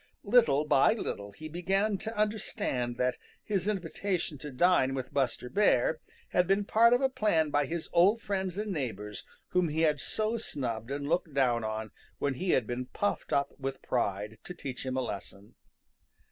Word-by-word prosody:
Little 155 - +4
by 145 +5 +5
little 100 - -4
he 155 +10 -9
began 195 +5 0
to 220 0 -5
understand 165 - -1
that 125 0 0 0.2
his 195 -3 -1
invitation 180 -5 -2
to 150 - -6
dine 135 -2 +3
with 130 +1 -5
Buster 130 -3 0
Bear 160 -4 +3 0.3
had 180 -1 +2
been 195 +1 +2
part 230 +3 +5
of 245 - +3
a 270 - +4
plan 185 - +1
by 145 -1 +2
his 165 +1 -3
old 195 +7 +5
friends 190 -4 -2
and 210 0 -2
neighbors 105 - -4 0.3
whom 180 -2 +2
he 155 +2 -1
had 150 -3 +2
so 220 +2 0
snubbed 120 - -3
and 140 +1 -3
looked 165 -2 0
down 120 -4 +2
on 110 0 -3 0.3
when 140 - 0
he 180 +8 -3
had 130 -8 +3
been 125 +2 -4
puffed 205 +10 -2
up 140 0 +1
with 135 0 -4
pride, 105 -2 -1
to 180 - -7
teach 130 -6 -6
him 130 0 -1
a - - +1
lesson. 100 -3 -7
150 Hz, 180 wpm, -30 LUFS, 125-195 Hz, 0.3 s, by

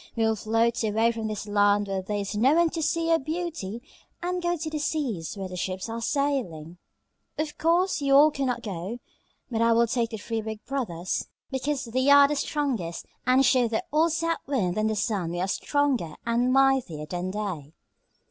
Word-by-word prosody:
We 225 - +1
will 220 0 +2
float 225 +3 +1
away 220 +2 +2
from 225 -1 -4
this 215 -1 -4
land 205 0 +3
where 195 -1 -2
there 205 +2 -3
is 200 +1 -3
no 255 +8 +4
one 340 -1 +3
to 330 - -3
see 330 +2 0
your 330 0 +4
beauty 310 - -4 0.4
and 360 0 -1
go 345 0 0
to 315 0 -5
the 310 -1 -3
seas 250 - -2
where 195 -1 -4
the 185 - -8
ships 185 +3 -3
are 230 +1 -4
sailing. 230 - -2 0.6
"Of 305 0 -3
course, 340 +1 +2
you 275 -1 +3
all 300 +2 +7
cannot 265 -4 -2
go, 195 +2 -5 0.5
but 225 -1 0
I 230 0 +4
will 235 +1 +4
take 235 0 0
the 225 - -5
three 225 +1 -3
big 220 0 -7
brothers 190 -11 -3 0.2
because 270 +1 -2
they 260 +4 +1
are 285 0 +8
the 295 - -1
strongest, 265 - -2 0.2
and 260 +2 +5
show 250 -2 +4
the 220 -1 -1
old 320 +2 +3
South 330 +1 0
Wind 205 -11 0
and 215 0 +1
the 220 - -1
Sun 195 -5 -1
we 175 - -3
are 185 - 0
stronger 260 - 0
and 235 +2 +1
mightier 265 - +2
than 175 +3 -4
they." 185 -8 -4
230 Hz, 200 wpm, -26 LUFS, 205-285 Hz, 0.6 s, are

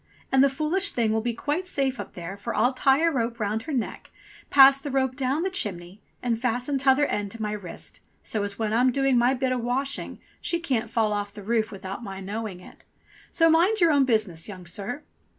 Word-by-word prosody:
And 265 0 +5
the 275 - +5
foolish 310 +8 +1
thing 230 -3 0
will 220 0 +1
be 235 0 -2
quite 305 +9 -2
safe 270 -6 -1
up - - -7
there, 175 +2 -7
for 200 - -5
I'll 245 +4 +3
tie 270 +4 +3
a 335 - +4
rope 235 -3 -2
round 215 +1 -1
her 310 - -7
neck, 255 -5 -3 0.4
pass 275 0 +8
the 290 - -6
rope 265 -1 0
down 275 +4 0
the 380 - -1
chimney, 190 - -2 0.2
and 230 -2 -1
fasten 250 +3 0
tother 270 +2 +4
end 205 -6 -2
to 230 - -9
my 210 - -2
wrist, 200 -5 -8 0.2
so 215 - -2
as 200 -1 -4
when 220 -1 -1
I'm 250 +3 +4
doing 270 0 +2
my 245 +2 +3
bit 260 0 -1
o' 255 - 0
washing, 260 +4 -3 0.2
she 340 - -1
can't 245 -9 -1
fall 220 -2 +1
off 205 0 -3
the 205 - -9
roof 220 +1 0
without 195 +2 -7
my 195 -3 -7
knowing 200 -1 -5
it. - - -16 0.5
So 330 - +3
mind 345 +7 +4
your 340 -3 +5
own 280 -2 +4
business, 210 -9 -1
young 185 -4 -9
sir." 205 - -5
245 Hz, 220 wpm, -25 LUFS, 210-275 Hz, 0.5 s, pass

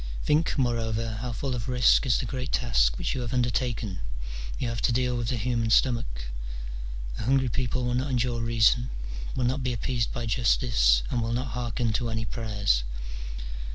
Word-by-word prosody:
Think, 155 +3 +2
moreover, 115 -3 0
how 125 0 -3
full 130 +3 -2
of 120 0 -3
risk 125 +2 +4
is 120 - +4
the 130 - -2
great 130 +2 -4
task - - +3
which - - -1
you 130 - -2
have 120 +1 -3
undertaken: 120 -5 0 0.6
you 125 - -2
have 115 -1 -2
to - - +3
deal 125 +1 +1
with 120 -1 -1
the 125 - 0
human 115 0 0
stomach: 115 - +2 1.0
a 110 - -3
hungry 130 0 +3
people 125 +2 -1
will 125 - 0
not 130 +3 0
endure 120 -2 0
reason, 115 +2 +3 0.5
will 130 - 0
not 130 +3 +1
be 125 -1 0
appeased 120 -1 -1
by 120 - -3
justice, 105 - +3
and 120 - +1
will 115 +1 -1
not 125 +2 -1
hearken 120 -1 -1
to 120 +1 -1
any 110 0 -2
prayers. 105 - 0
120 Hz, 185 wpm, -27 LUFS, 115-125 Hz, 1.0 s, risk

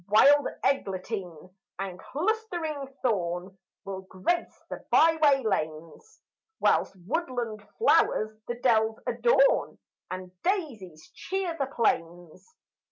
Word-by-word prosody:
Wild 280 +8 +6 0.2
eglantine 185 - -2 0.3
and 190 -2 -5
clustering 340 -5 -2 0.2
thorn 185 -5 -1 0.3
Will 195 -1 -5
grace 190 - -2
the - - -6
byway 310 -4 +4
lanes, 160 - -4 0.4
Whilst - - +2
woodland 245 - -2 0.2
flowers 215 - +3
the 240 - -2
dells 225 -2 +2
adorn - - +3 0.3
And 185 0 -6
daisies 210 - -3
cheer 375 -2 -3
the 275 -5 -2
plains. 175 - -2
225 Hz, 100 wpm, -27 LUFS, 185-310 Hz, 0.4 s, Wild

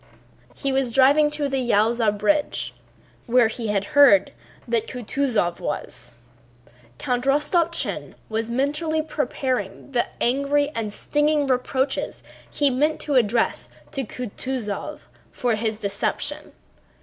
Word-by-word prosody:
He 275 - -2
was 265 -2 +1
driving 280 +4 +5
to 295 -1 -1
the 270 -1 -1
Yaúza 225 -1 +2
bridge 295 +9 0 0.5
where 240 -1 +4
he 225 0 -4
had 200 -1 0
heard 250 -10 +6 0.4
that 230 -1 0
Kutúzov 245 -7 -1
was. - - -5 0.8
Count 250 0 -1
Rostopchín 315 +5 0
was 225 +1 -2
mentally 300 +5 0
preparing 260 -7 -3
the 245 -2 +1
angry 280 +3 +2
and 225 -7 -4
stinging 295 +5 +1
reproaches 265 +1 -1 0.3
he 285 -2 +2
meant 300 +5 +1
to 295 - -2
address 230 -2 +2 0.2
to 270 - -2
Kutúzov 250 +3 -5 0.3
for 245 -2 0
his 220 0 -1
deception. 200 -2 -2
255 Hz, 115 wpm, -23 LUFS, 225-290 Hz, 0.8 s, heard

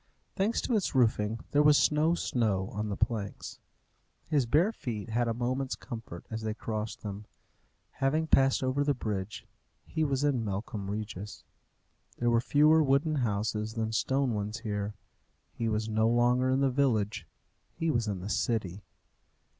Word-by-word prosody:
Thanks 210 +4 +1
to 245 - 0
its 200 -8 0
roofing, 110 -3 +2
there 145 - +4
was 150 0 +5
no 155 +3 +2
snow 105 - 0
on 105 +1 -3
the 100 - -2
planks. 110 -3 -3 0.7
His 145 -6 +1
bare 165 - +3
feet 115 - -5
had 120 +2 +1
a 115 - 0
moment's 130 +2 -1
comfort 110 -7 -8
as 110 0 -3
they 110 -1 -3
crossed 110 -1 -4
them. 105 0 -6 0.7
Having 150 +4 0
passed 135 -3 +3
over 130 +2 +1
the 145 -1 +1
bridge, 105 -3 -4 0.4
he 160 - -1
was 140 -2 0
in 135 -5 +1
Melcombe 100 0 -4
Regis. 105 -1 -5 0.7
There 120 0 +1
were 115 0 +3
fewer 150 +4 +5
wooden 150 +2 +2
houses 110 -1 -1
than 110 -1 -1
stone 130 +3 +1
ones 105 +2 -3
there. 105 -1 -3 0.6
He 115 -1 -2
was 110 0 -1
no 110 +1 +2
longer 120 +2 +3
in 130 +1 +2
the 135 -1 +3
village; 115 -6 0 0.5
he 165 -1 0
was 120 -5 0
in 100 -3 -3
the 95 - -5
city. 105 -5 -1
115 Hz, 160 wpm, -30 LUFS, 105-135 Hz, 0.7 s, was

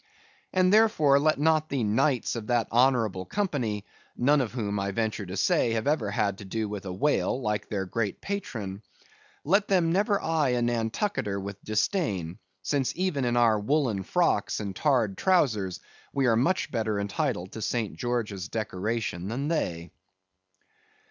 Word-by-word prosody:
And 185 +1 +3
therefore, 210 -11 +5
let 155 +2 +2
not 155 0 +2
the 135 -4 -1
knights 125 +5 +1
of 110 -2 -5
that 120 -2 +1
honorable 115 -6 +2
company 125 - -2 0.3
(none 140 +3 +4
of 120 - -2
whom, 105 -5 -2
I 100 0 -1
venture 110 -1 -2
to 95 +2 -5
say, 115 +4 +2
have 110 +1 -1
ever 140 -8 +1
had 100 -1 -1
to 100 - -9
do 110 +3 -2
with 100 -1 -6
a - - -3
whale 130 +6 +1
like 105 -4 -2
their 100 -3 -2
great 105 +2 -2
patron), 110 - -5 0.6
let 195 +7 +2
them 175 -4 +2
never 200 +3 +2
eye 155 -7 +1
a 120 - 0
Nantucketer 115 - -1
with 100 0 -7
disdain, 105 - -1 0.2
since 135 +5 0
even 175 -8 0
in 120 0 +1
our 115 -3 +4
woollen 125 -3 +1
frocks 165 - +1
and 100 -3 -5
tarred 120 -9 +1
trowsers 110 - +2 0.3
we 135 -1 +1
are 115 -2 +4
much 170 +11 +1
better 110 -3 -1
entitled 100 - -2
to 110 - -7
St. 110 -1 -2
George's 115 -7 -2
decoration 105 -3 -3
than 135 +7 -2
they. 85 - -2
115 Hz, 160 wpm, -27 LUFS, 100-150 Hz, 0.6 s, therefore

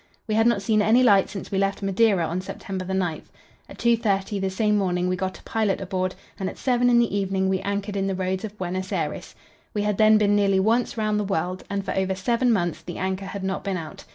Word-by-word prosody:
We 215 - -1
had 225 +2 +4
not 220 -4 +2
seen 215 +1 +2
any 225 +5 +4
light 200 -5 +5
since 195 -1 -7
we 195 - 0
left 195 +1 -1
Madeira 195 -2 +3
on 175 +3 -2
September 190 0 -6
9. 180 -4 -1 0.5
At - - -11
2.30 210 -4 +1
the 190 - 0
same 210 +2 +1
morning 180 -3 0
we 185 - +1
got 185 +1 -3
a - - -19
pilot 215 -3 0
aboard, 185 -1 -2 0.2
and 190 -1 -1
at - - -10
seven 245 -1 +2
in 240 - +5
the 235 -3 +2
evening 190 -1 0
we 190 0 +1
anchored 200 +1 -3
in 195 0 0
the 195 - -1
roads 185 +1 -2
of 210 -1 -7
Buenos 185 0 -4
Aires. - - -3 0.4
We 205 - 0
had 210 -1 -1
then 215 0 +6
been 205 -1 +3
nearly 200 -2 +3
once 230 +5 +1
round 215 -1 0
the - - 0
world, 185 -1 -2
and 200 -1 -2
for - - -2
over 190 0 0
seven 235 +6 +1
months 175 -7 0
the 175 - -7
anchor 190 +1 -2
had 195 0 -6
not 190 0 -2
been 195 -2 -2
out. 160 -3 -8
195 Hz, 240 wpm, -24 LUFS, 190-215 Hz, 0.5 s, then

